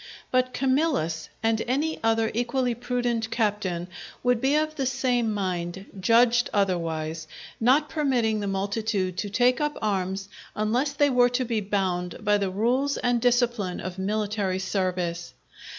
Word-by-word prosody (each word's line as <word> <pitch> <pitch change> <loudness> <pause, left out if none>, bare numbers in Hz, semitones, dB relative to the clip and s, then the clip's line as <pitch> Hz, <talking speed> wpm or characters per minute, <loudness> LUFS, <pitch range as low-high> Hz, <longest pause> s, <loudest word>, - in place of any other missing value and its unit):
But 255 0 +2
Camillus, 260 - 0
and 225 0 +2
any 295 +6 0
other 225 0 +2
equally 245 +1 0
prudent 240 -1 -1
captain 205 -6 -1 0.4
would 245 -2 +2
be 275 +2 +2
of 310 0 +1
the 270 -4 -1
same 245 -3 +1
mind, 185 -2 -3
judged 235 +4 +4
otherwise, 165 -5 -1 0.3
not 265 +6 +4
permitting 255 -9 +1
the 205 - -3
multitude 195 -1 -1
to 205 - -2
take 245 +6 +2
up 295 0 -1
arms 195 -2 -1 0.3
unless 240 +7 0
they 285 0 +3
were 245 -1 +5
to 250 +1 -1
be 225 -2 -1
bound 185 -3 -2
by 205 0 +3
the 195 -1 0
rules 245 +8 +1
and 245 -1 +1
discipline 240 -6 +1
of 185 0 -6
military 205 -1 -1
service. 180 -3 -2
225 Hz, 145 wpm, -26 LUFS, 190-250 Hz, 0.4 s, were